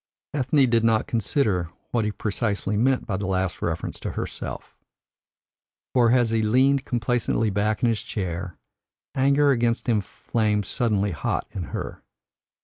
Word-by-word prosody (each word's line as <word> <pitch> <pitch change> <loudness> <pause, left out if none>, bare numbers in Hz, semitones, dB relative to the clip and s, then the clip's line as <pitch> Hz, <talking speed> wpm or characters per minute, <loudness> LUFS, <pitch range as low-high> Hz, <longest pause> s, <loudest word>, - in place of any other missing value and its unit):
Ethne 135 0 +3
did 115 -1 +2
not 110 -1 +3
consider 105 - 0 0.2
what 115 -3 +1
he 105 - 0
precisely 105 -1 -1
meant 130 +4 +2
by 100 - -2
the 100 -1 -3
last 95 -1 -1
reference 85 0 -3
to - - -4
herself. - - -6 1.2
For 120 -2 +4
as 120 -2 +3
he 115 -1 +2
leaned 130 +5 +3
complacently 120 -2 0
back 105 +3 0
in 120 - +5
his 115 -2 0
seat, 90 -3 -3 0.7
anger 140 +2 +4
against 120 -2 +1
him 110 -4 +3
flamed 105 0 -1
suddenly 105 -5 0
hot 80 -8 -2
in 90 -4 -4
her. - - -6
110 Hz, 145 wpm, -25 LUFS, 100-125 Hz, 1.2 s, in